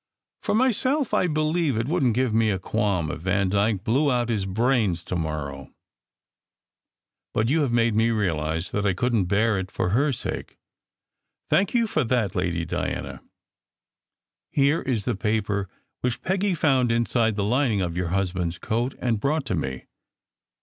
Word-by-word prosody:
For -, -, 0 dB
myself, 260 Hz, +3 st, +1 dB
I 180 Hz, -, +3 dB
believe 155 Hz, -3 st, 0 dB
it 115 Hz, +2 st, -1 dB
wouldn 145 Hz, -6 st, +2 dB
t 120 Hz, -, 0 dB
give 125 Hz, -4 st, 0 dB
me 110 Hz, 0 st, +3 dB
a 100 Hz, -, +1 dB
qualm 95 Hz, -5 st, -1 dB
if -, -, -6 dB
Vandyke 100 Hz, +2 st, +1 dB
blew 135 Hz, +7 st, +2 dB
out 120 Hz, -1 st, 0 dB
his 105 Hz, -4 st, -1 dB
brains 105 Hz, -4 st, +1 dB
to 90 Hz, -, -4 dB
morrow, 75 Hz, -4 st, -4 dB, 1.6 s
but 110 Hz, +2 st, +2 dB
you 155 Hz, +3 st, +3 dB
have 140 Hz, -5 st, +1 dB
made 115 Hz, -1 st, +2 dB
me 110 Hz, +2 st, +3 dB
realize 85 Hz, -6 st, -1 dB
that 105 Hz, -, -1 dB
I 100 Hz, -3 st, +1 dB
couldn 115 Hz, -2 st, +1 dB
t -, -, -6 dB
bear 105 Hz, +1 st, +2 dB
it 95 Hz, 0 st, -5 dB
for 90 Hz, +1 st, -1 dB
Tier 140 Hz, +5 st, +3 dB
sake. 125 Hz, -, -5 dB, 0.9 s
Thank 195 Hz, +4 st, +2 dB
you 235 Hz, -1 st, +4 dB
for 155 Hz, -8 st, 0 dB
that, 115 Hz, -6 st, 0 dB
Lady 85 Hz, -2 st, -1 dB
Diana. -, -, -4 dB, 1.3 s
Here 140 Hz, +3 st, +2 dB
is 120 Hz, -6 st, -1 dB
the -, -, 0 dB
paper 100 Hz, -2 st, -1 dB, 0.3 s
which 125 Hz, -1 st, -2 dB
Peggy 190 Hz, +1 st, +1 dB
found 135 Hz, -6 st, +2 dB
inside 115 Hz, -1 st, +1 dB
the 100 Hz, -, -1 dB
lining 115 Hz, -1 st, +1 dB
of 85 Hz, -2 st, -2 dB
your 90 Hz, -1 st, -1 dB
hus 95 Hz, +1 st, 0 dB
band 90 Hz, -2 st, -2 dB
s -, -, -10 dB
coat, 120 Hz, +8 st, -2 dB
and 115 Hz, -4 st, 0 dB
brought 140 Hz, +5 st, 0 dB
to -, -, -2 dB
me. 65 Hz, -5 st, -3 dB
110 Hz, 175 wpm, -25 LUFS, 95-135 Hz, 1.6 s, you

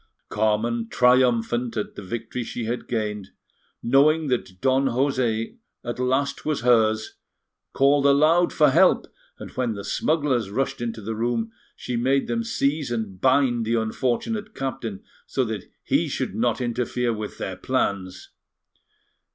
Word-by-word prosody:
Carmen 110 Hz, +2 st, 0 dB
triumphant 125 Hz, -1 st, +2 dB
at 105 Hz, -, -3 dB
the -, -, -8 dB
victory 115 Hz, +5 st, -5 dB
she 115 Hz, -, -5 dB
had 120 Hz, +2 st, -3 dB
gained, 105 Hz, -4 st, -3 dB, 0.5 s
knowing 145 Hz, +5 st, +3 dB
that 95 Hz, -7 st, -2 dB
Don 135 Hz, +3 st, +2 dB
José 125 Hz, -, 0 dB, 0.3 s
at 120 Hz, +1 st, -5 dB
last 130 Hz, +2 st, 0 dB
was 155 Hz, -6 st, -1 dB
hers, 110 Hz, -3 st, +2 dB, 0.5 s
called 140 Hz, +1 st, +3 dB
aloud 155 Hz, +5 st, +4 dB
for 150 Hz, -3 st, +4 dB
help, -, -, +4 dB, 0.3 s
and -, -, -9 dB
when 120 Hz, -4 st, -2 dB
the 100 Hz, -, -6 dB
smugglers 140 Hz, -9 st, 0 dB
rushed 130 Hz, +4 st, -2 dB
into 115 Hz, -2 st, -4 dB
the 110 Hz, +3 st, -3 dB
room, 115 Hz, 0 st, -1 dB, 0.2 s
she 125 Hz, -, -5 dB
made 135 Hz, +3 st, +2 dB
them 230 Hz, 0 st, -1 dB
seize 150 Hz, -, -1 dB
and 110 Hz, -6 st, -4 dB
bind 130 Hz, -3 st, +3 dB
the 115 Hz, +1 st, 0 dB
unfortunate 130 Hz, -, -2 dB
captain 120 Hz, -6 st, -4 dB, 0.2 s
so 130 Hz, -, 0 dB
that 110 Hz, -5 st, -4 dB, 0.2 s
he -, -, +1 dB
should -, -, -3 dB
not -, -, 0 dB
interfere 120 Hz, 0 st, -1 dB
with 105 Hz, -1 st, -6 dB
their -, -, -4 dB
plans. 95 Hz, -2 st, -2 dB
120 Hz, 145 wpm, -24 LUFS, 110-135 Hz, 0.5 s, aloud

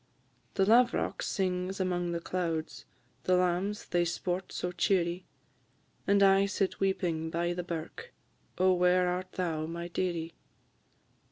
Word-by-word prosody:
The 195 Hz, -, +3 dB
lav'rock 240 Hz, +3 st, +3 dB
sings 185 Hz, 0 st, -1 dB
among 175 Hz, -2 st, 0 dB
the 170 Hz, -, -1 dB
clouds, 165 Hz, -2 st, -3 dB, 0.4 s
The 185 Hz, -, +4 dB
lambs 180 Hz, +3 st, 0 dB
they 175 Hz, 0 st, +1 dB
sport 175 Hz, +2 st, -2 dB
so 180 Hz, -, -3 dB
cheerie, 180 Hz, -1 st, +1 dB, 0.8 s
And 200 Hz, 0 st, +5 dB
I 195 Hz, 0 st, +5 dB
sit 195 Hz, -1 st, -1 dB
weeping 175 Hz, -4 st, 0 dB
by 170 Hz, +1 st, -1 dB
the 180 Hz, -, -3 dB
birk: 175 Hz, -, -6 dB, 0.5 s
O 185 Hz, 0 st, +4 dB
where 180 Hz, 0 st, +3 dB
art 180 Hz, +1 st, -3 dB
thou, 160 Hz, -4 st, -2 dB
my 170 Hz, +1 st, -5 dB
dearie? 170 Hz, -2 st, -2 dB
180 Hz, 135 wpm, -30 LUFS, 170-190 Hz, 0.8 s, And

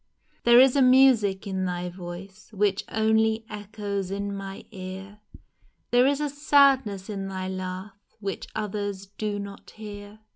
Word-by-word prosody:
There 240 Hz, 0 st, +8 dB
is 260 Hz, 0 st, +6 dB
a 280 Hz, -, +4 dB
music 255 Hz, -7 st, +5 dB
in 190 Hz, -1 st, -2 dB
thy 180 Hz, 0 st, -3 dB
voice 185 Hz, +4 st, -10 dB
Which 205 Hz, -1 st, +1 dB
only 220 Hz, 0 st, +2 dB
echoes 205 Hz, -2 st, -4 dB
in 200 Hz, +1 st, -3 dB
my 195 Hz, 0 st, -7 dB
ear, 190 Hz, +1 st, -8 dB, 0.7 s
There 245 Hz, +2 st, +5 dB
is 280 Hz, 0 st, +1 dB
a 300 Hz, -, 0 dB
sadness 275 Hz, -8 st, +3 dB
in 195 Hz, -3 st, -4 dB
thy 190 Hz, -1 st, -4 dB
laugh 185 Hz, +1 st, -5 dB, 0.3 s
Which 200 Hz, -2 st, -4 dB
others 205 Hz, -2 st, -3 dB
do 205 Hz, +1 st, -4 dB
not 200 Hz, 0 st, -8 dB
hear 205 Hz, -1 st, -10 dB
205 Hz, 145 wpm, -26 LUFS, 195-220 Hz, 0.7 s, There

